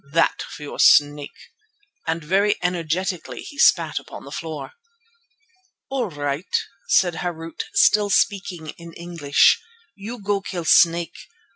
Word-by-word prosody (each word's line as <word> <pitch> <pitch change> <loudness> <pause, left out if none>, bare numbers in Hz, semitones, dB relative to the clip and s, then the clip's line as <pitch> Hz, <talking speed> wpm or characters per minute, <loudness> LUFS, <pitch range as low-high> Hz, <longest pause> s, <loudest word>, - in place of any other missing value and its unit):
That 165 0 +2
for 150 - -9
your 145 - -8
snake," 145 0 +3 0.6
and 165 0 -2
very 195 +6 +2
energetically 180 0 -2
he 285 - -11
spat - - +4
upon - - -11
the - - -11
floor. 160 -2 -6 1.2
"All 255 -6 -1
right," 145 +2 -2 0.3
said 175 -2 +3
Harût, 165 -2 -6 0.2
still 210 - +4
speaking 185 -5 0
in 170 0 -11
English, 165 -5 +2 0.3
"you 220 +4 -8
go 200 0 -1
kill 175 -3 -5
snake. 170 +1 +3
170 Hz, 125 wpm, -22 LUFS, 160-195 Hz, 1.2 s, spat